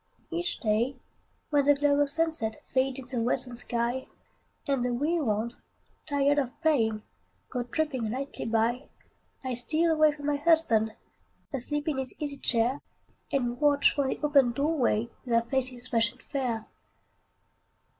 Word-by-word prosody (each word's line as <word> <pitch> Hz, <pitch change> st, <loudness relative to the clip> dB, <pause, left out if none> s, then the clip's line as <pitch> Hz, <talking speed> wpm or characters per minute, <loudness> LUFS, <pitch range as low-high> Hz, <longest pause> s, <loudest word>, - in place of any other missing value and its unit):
Each 345 Hz, +1 st, -1 dB
day, 230 Hz, +4 st, +1 dB, 0.6 s
when 285 Hz, -2 st, +3 dB
the 290 Hz, 0 st, +6 dB
glow 285 Hz, 0 st, +2 dB
of 290 Hz, -1 st, +3 dB
sunset 305 Hz, -8 st, 0 dB
Fades 260 Hz, 0 st, 0 dB
in 245 Hz, -, 0 dB
the -, -, 0 dB
western 245 Hz, +1 st, +1 dB
sky, 240 Hz, +1 st, -1 dB, 0.6 s
And 275 Hz, -3 st, +1 dB
the 250 Hz, -, 0 dB
wee 310 Hz, +7 st, 0 dB
ones, 230 Hz, -3 st, -1 dB, 0.5 s
tired 285 Hz, 0 st, +2 dB
of 265 Hz, -1 st, -4 dB
playing, 225 Hz, -9 st, +2 dB, 0.5 s
Go 250 Hz, -, -1 dB
tripping 255 Hz, -2 st, -2 dB
lightly 270 Hz, +5 st, -4 dB
by, 230 Hz, +4 st, 0 dB, 0.5 s
I 260 Hz, -1 st, -2 dB
steal 315 Hz, +7 st, +1 dB
away 310 Hz, -1 st, +5 dB
from 290 Hz, -1 st, -9 dB
my 290 Hz, 0 st, +1 dB
husband, 285 Hz, -9 st, +3 dB, 0.6 s
Asleep 290 Hz, +3 st, -3 dB
in 290 Hz, -4 st, 0 dB
his 260 Hz, -1 st, -5 dB
easy 285 Hz, -2 st, -4 dB
chair, 245 Hz, +1 st, +2 dB, 0.5 s
And 245 Hz, -2 st, -1 dB
watch 290 Hz, -1 st, +4 dB
from 280 Hz, -2 st, 0 dB
the -, -, -2 dB
open 280 Hz, -5 st, +4 dB
door 295 Hz, +6 st, 0 dB
way 235 Hz, -4 st, +1 dB
Their 230 Hz, -2 st, +2 dB
faces 255 Hz, 0 st, -2 dB
fresh 230 Hz, -2 st, +3 dB
and 255 Hz, -, -21 dB
fair. 245 Hz, -6 st, -2 dB
265 Hz, 155 wpm, -28 LUFS, 235-290 Hz, 0.6 s, the